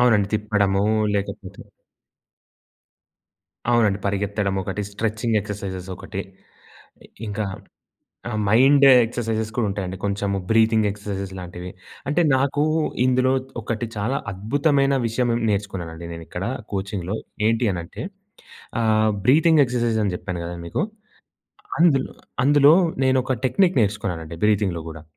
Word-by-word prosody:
అవునండి. 110 -5 +4
తిప్పడము 105 -2 +1 0.3
లేకపోతే 100 -1 -4 2.1
అవునండి. 105 -4 +3
పరిగెత్తడం 100 0 -1
ఒకటి. 95 +2 -4
స్ట్రెచింగ్ 110 +1 -1
ఎక్సర్సైజెస్ 95 -3 -6
ఒకటి. 100 -1 -6 1.1
ఇంకా 105 +1 -2 0.9
ఆహ్, 110 - -2
మైండ్ 135 +5 +6 0.2
ఎక్సర్సైజెస్ 110 -2 -3
కూడా 120 - +1
ఉంటాయండి. 95 -2 -4
కొంచెము 100 0 -1
బ్రీతింగ్ 110 -1 +4
ఎక్సర్సైసెస్ 100 -1 -5
లాంటివి. 90 0 -7 0.4
అంటే 150 +4 +2
నాకు 140 +2 +1 0.4
ఇందులో 130 +1 +3 0.3
ఒకటి 115 +1 -3
చాలా 120 +7 -1
అద్భుతమైన 140 - +1
విషయం 120 +2 0 0.2
నేర్చుకున్నానండి 85 -5 -3
నేనిక్కడ 85 +3 -6 0.3
కోచింగ్‌లో 95 0 -3 0.3
ఏంటి 115 +2 +2
అనంటే 85 -1 -6 0.8
ఆహ్, 110 -1 +3 0.2
బ్రీతింగ్ 155 +3 +5
ఎక్సర్సైజ్ 120 -3 0
అని 95 - -1
చెప్పాను 90 -2 -5
గదా 85 +1 -5
మీకు. 85 - -1 1.0
అందులో, 145 -6 +3 0.3
అందులో 145 +2 +6 0.3
నేను 130 0 +3
ఒక 130 - -1
టెక్నిక్ 175 +6 +2
నేర్చుకున్నానండి 90 -6 -2
బ్రీతింగ్‍లో 95 -6 +1
గూడా 80 -1 -9
105 Hz, 110 wpm, -23 LUFS, 95-120 Hz, 2.1 s, మైండ్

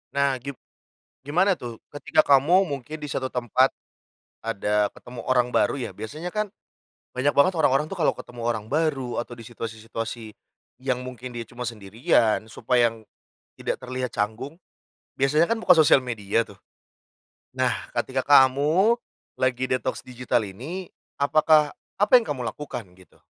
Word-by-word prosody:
Nah, 140 -2 +2
gib 140 +1 -7 0.7
gimana 180 +6 +3
tuh 120 -2 -8
ketika 150 +2 +2
kamu 160 +8 +4
mungkin 145 +2 -5
di 150 - -4
suatu 130 -1 -3
tempat, 125 +2 +2 0.7
ada 105 -1 0
ketemu 120 -1 -10
orang 125 -1 +2
baru - - +2
ya, 120 - -4
biasanya 145 - -6
kan 215 +1 -1 0.7
banyak 140 +3 +1
banget 140 +7 +5
orang-orang 150 +2 +2
tuh 195 - -6
kalau 155 - +2
ketemu 120 -1 -10
orang 115 -3 -1
baru 140 -5 0
atau 120 0 -7
di 115 - -11
situasi-situasi 115 -1 -6 0.5
yang 130 -1 -1
mungkin 125 0 -8
dia 120 - -4
cuma 125 0 -6
sendirian, 110 +1 +1
supaya 115 0 +1 0.5
tidak - - -3
terlihat 125 -1 -4
canggung, 115 - -3 0.6
biasanya 150 +6 +3
kan 230 - +1
buka 185 -5 +6
sosial 155 -3 +6
media 115 -2 -1
tuh. 100 - -14 1.0
Nah, - - +1 0.2
ketika 130 0 -1
kamu 145 - +5 0.4
lagi 130 0 0
detoks 130 0 -1
digital 125 -1 -1
ini, 155 - -7 0.3
apakah 150 +1 +4 0.2
apa 205 +3 +2
yang 240 - +3
kamu 145 - -4
lakukan 125 -5 -7
gitu? 95 -1 -21
130 Hz, 145 wpm, -25 LUFS, 115-150 Hz, 1.0 s, buka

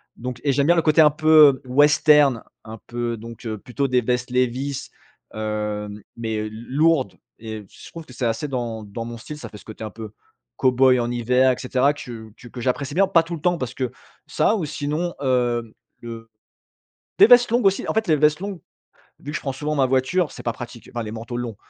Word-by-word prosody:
Donc 125 0 -6
et 140 - +2
j'aime 140 +1 +1
bien 175 - +5
le 165 - +3
côté 155 +1 +5
un 150 - +7
peu 155 -3 +6
western, 145 -1 +4 0.2
un 110 0 -9
peu 120 -1 -3
donc, 115 +2 -11
heu, 110 -1 -3
plutôt 135 +6 -3
des 125 -1 +2
vestes 125 +1 -1
Levi's, 130 +2 -1 0.4
heu, 105 -1 -3 0.3
mais 110 -1 -3
l 110 +2 -10
lourdes. 150 0 +2 0.3
Et 110 -2 -7
je - - -14
trouve 165 -1 -9
que 130 - -14
c'est 120 - -3
assez 115 +6 -2
dans 120 -4 -4
dans 105 +3 -6
mon 120 0 -7
style 150 +6 -9
ça - - -8
fait 105 - -11
ce - - -17
côté 110 0 -9
un 110 - -4
peu 110 0 -9 0.5
cow-boy 130 0 +4
en 120 0 -1
hiver 125 +2 +3
et - - 0
cetera, 130 +2 +1
que 120 -7 -9
que 120 - -13
que 120 0 -9
j'apprécie 130 +3 -2
bien. 195 +1 +4
Pas 170 -3 +4
tout 170 +1 -7
le 155 - -10
temps 175 +1 +1
parce 125 -2 -4
que 130 -2 -3 0.4
ça 220 - +2
ou 185 -7 -2
sinon, 150 +4 -3
heu, 120 -3 0 0.3
le 115 -1 -9 0.9
des - - +9
vestes 245 -1 +6
longues 240 -2 +2
aussi, 195 - 0
en - - -1
fait, 220 -3 0
les 155 - +4
vestes 150 +1 +3
longues 195 -2 -5 0.6
vu 145 - -7
que 155 - -5
je - - -9
prends 135 - -3
souvent 150 +3 -3
ma 135 -2 +3
voiture 135 +5 +1
c'est - - -10
pas 120 - 0
pratique, 120 0 -10
enfin, 120 - -3
les 105 - -6
manteaux 115 +2 -6
longs. 120 -3 -4
130 Hz, 225 wpm, -22 LUFS, 115-150 Hz, 0.9 s, des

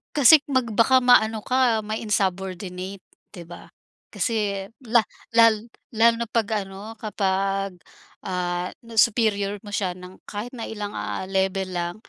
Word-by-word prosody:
Kasi, 295 +1 +7
mag 260 -3 +2
baka 260 +4 +5
ma-ano 225 -3 +4
ka, 250 0 +2
ma 215 - -2
insubordinate, 190 -2 -3 0.3
hindi 175 -4 -10
ba? 175 - -12 0.4
Kasi, 205 -4 -1 0.2
la 235 0 +4 0.3
lal 230 0 +4 0.2
lalo 230 +1 +5
na 235 - -2
kapag 225 -2 0 0.2
ano 195 0 -10 0.2
kapag, 195 -2 -1 0.5
ah, 180 -1 -2 0.2
na 230 0 -12
superior 205 -3 +2
mo 205 - -10
siya 185 -3 -1
ng 180 +1 -12
kahit 215 +4 -6
na 235 -3 -6
ilang, 210 -2 -5
ah, - - -4
level 190 0 -1
lang, 175 0 -3
205 Hz, 145 wpm, -24 LUFS, 190-230 Hz, 0.5 s, Kasi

